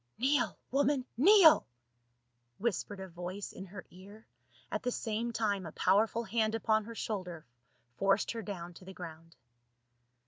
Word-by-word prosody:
"jy^NEEL, 265 +1 +2 0.2
woman, 275 -1 +2
kneel!" 330 - +7 0.9
whispered 205 -2 -2
a 190 - -6
voice 180 +3 -6
in 190 - -8
J - - -16
^ - - -19
her 190 -3 -8
ear, 200 +4 -14 0.5
at - - -2
the 250 - -1
same 230 0 -2
time 210 -4 0
a 160 - -7
powerful 215 +5 +2
hand 225 -1 0
upon 220 -1 +1
her 230 +1 -8
shoulder 180 -8 -4 0.5
forced 195 +1 +2
her 230 - -4
down 180 -4 -6
to 180 - -14
the 190 - -9
ground. 165 -1 -10
210 Hz, 160 wpm, -32 LUFS, 185-235 Hz, 0.9 s, kneel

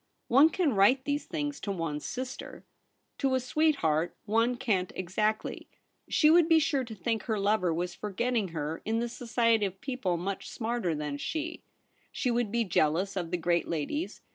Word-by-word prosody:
One 275 +6 +7
can 325 -5 +1
write 240 +7 +4
these 290 0 -1
things 290 -2 -3
to 200 - -3
one's 165 -5 -3
sister. 255 0 -6 0.5
To 270 -1 +2
a - - +2
sweetheart 250 - +1
one 230 +3 +2
can't 190 -7 0
exactly; 210 +4 -2 0.4
she 305 -1 +5
would 335 0 +5
be 325 - +7
sure 290 -4 +2
to 230 -3 -8
think 220 +3 -2
her 220 -3 0
lover 200 -3 +2
was 175 +2 -2
forgetting 215 +3 -1
her 160 -1 -4
in 225 +1 0
the 235 +1 0
society 230 -3 +1
of 190 0 -10
people 250 -10 -2
much 190 +3 -4
smarter 225 -7 -2
than 150 -1 -3
she; 320 - -4 0.5
she 250 - -1
would 235 -3 0
be 235 +1 +1
jealous 180 +1 +1
of 175 -3 -2
the 180 - -1
great 170 0 +1
ladies, 155 -3 -2
ROLFE 310 +5 -4
BELLARMIN. - - -42
220 Hz, 185 wpm, -29 LUFS, 180-255 Hz, 0.5 s, One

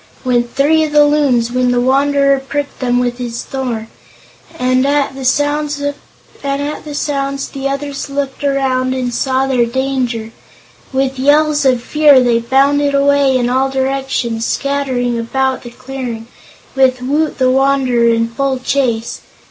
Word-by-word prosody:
went 240 -1 +1
three 310 +4 +2
of 310 - -2
the 295 0 +5
Loons, 275 -6 +2
when 250 0 +1
the 245 0 +2
Wanderer 275 +2 +2
pricked 280 +1 -5
them 245 -1 0
with 245 0 -1
his 235 -1 -4
thorn, 245 -5 -4 0.7
and 255 +1 +1
at 280 0 +1
the 265 0 -8
sounds 290 +3 0 0.6
the 275 -1 -3
others 275 0 -4
looked 275 0 -4
around 260 -2 0
and 250 -2 -2
saw 260 +2 0
their 250 -3 +1
danger. 250 -3 -2 0.6
With 265 0 -1
yells 295 +1 +3
of 250 -3 +2
fear 295 -1 +5
they 240 -2 +2
bounded 280 +4 +2
away 280 -1 +3
in 245 -1 0
all 260 +2 +1
directions, 265 -4 -2
scattering 255 -3 -1
about 265 +3 -1
the 240 - -9
clearing, 250 -2 -7 0.5
with 255 -1 +2
Woot 300 +4 0
the 255 -1 +2
Wanderer 265 -3 +2
in 230 0 +2
full 265 +3 -1
chase. 250 -3 -1
265 Hz, 140 wpm, -15 LUFS, 250-280 Hz, 0.7 s, the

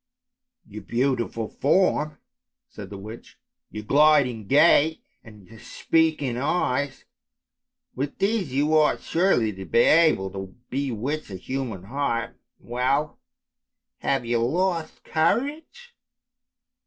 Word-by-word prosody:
" - - -63
" - - -55
Your 105 +1 -9
beautiful 120 0 -1
form," 155 -1 +1 0.5
said 100 -3 -10
the 100 - -8
witch, 110 +4 -11 0.2
" - - -63
your 105 - -7
gliding 140 -4 +3
gait, 155 +3 +4 0.2
and 105 -3 -15
your 115 -1 -15
speaking 155 0 0
eyes, 140 -1 -1 0.9
with 140 +2 -4
these 195 - 0
you 145 +4 +1
ought 155 -1 +3
surely 165 - +1
to 95 0 -8
be - - -2
able 155 - +4
to 95 -1 -8 0.2
bewitch 140 +2 -3
a 95 - -7
human 115 -2 -5
heart. 120 +1 -2 0.2
Well! 130 +5 -1 0.8
have 135 -3 -1
you 120 0 0
lost 165 +4 -1
courage 290 - -2
135 Hz, 120 wpm, -24 LUFS, 115-155 Hz, 0.9 s, gait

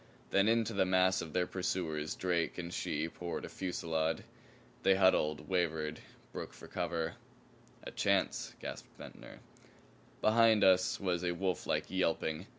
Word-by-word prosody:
Then 100 +1 +4
into 115 0 +2
the 100 - +3
mass 95 0 +3
of 80 - -6
their 90 +2 +1
pursuers 80 -5 -2
Drake 85 -3 0
and 85 -1 -5
she 75 +2 -1
poured 85 +1 -5
a - - -8
fusillade. 80 -3 -2 0.6
They 95 - +5
huddled, 80 -5 +3
wavered, 80 -4 0 0.3
broke - - -6
for - - -12
cover. 80 -2 -2 0.7
"A - - -7
chance!" - - 0
gasped - - -7
Ventnor. - - -11 0.8
Behind 110 -1 +5
us 95 -1 +4
was 90 -3 0
a 90 -1 0
wolflike 95 -2 -1
yelping. 80 -4 0
90 Hz, 140 wpm, -33 LUFS, 80-95 Hz, 0.8 s, They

